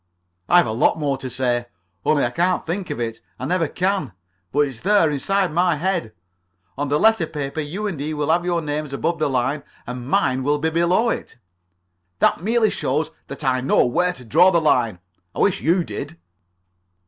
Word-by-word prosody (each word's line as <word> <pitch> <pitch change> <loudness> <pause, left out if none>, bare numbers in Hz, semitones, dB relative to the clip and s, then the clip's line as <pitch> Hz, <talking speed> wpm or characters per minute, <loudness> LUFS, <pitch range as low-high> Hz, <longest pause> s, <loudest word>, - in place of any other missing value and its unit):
"I've 175 0 +6
a 110 - -2
lot 115 +7 +2
more 145 -3 0
to 130 -1 -6
say, 120 -1 -1 0.4
only 145 -4 +2
I 120 - -2
can't 180 +7 0
think 180 +2 -3
of 145 - -4
it. 115 -1 -4 0.2
I 130 - -5
never 165 +2 +1
can. 185 - -1 0.4
But 145 - +2
it's 135 -6 -1
there. 190 - +3
Inside 190 +6 0
my 175 +1 +2
head. 170 - -1 0.6
On 145 +1 -2
the 145 +1 +2
letter 220 -7 +4
paper 145 -1 -4
you 175 +9 -4
and 185 -8 -3
he 155 +2 -3
will 150 +1 0
have 175 +1 +2
your 175 -2 0
names 150 -1 -3
above 165 +4 -1
the 155 -2 +1
line, 135 +3 0 0.2
and 125 +1 -6
mine 130 -2 +2
will 145 +3 +1
be 160 +2 -1
below 175 +8 +2
it." - - -6 0.8
"That - - +2
merely 220 +2 +2
shows 150 +4 -1 0.2
that 140 +2 -8
I 130 -2 +1
know 130 - +3
where 180 +9 +1
to 125 - -13
draw 170 +11 +5
the 170 -2 +3
line. 115 - +2 0.4
I - - -5
wish 195 -1 +2
you 175 +3 +2
did." 105 - -7
150 Hz, 195 wpm, -21 LUFS, 130-175 Hz, 0.8 s, I've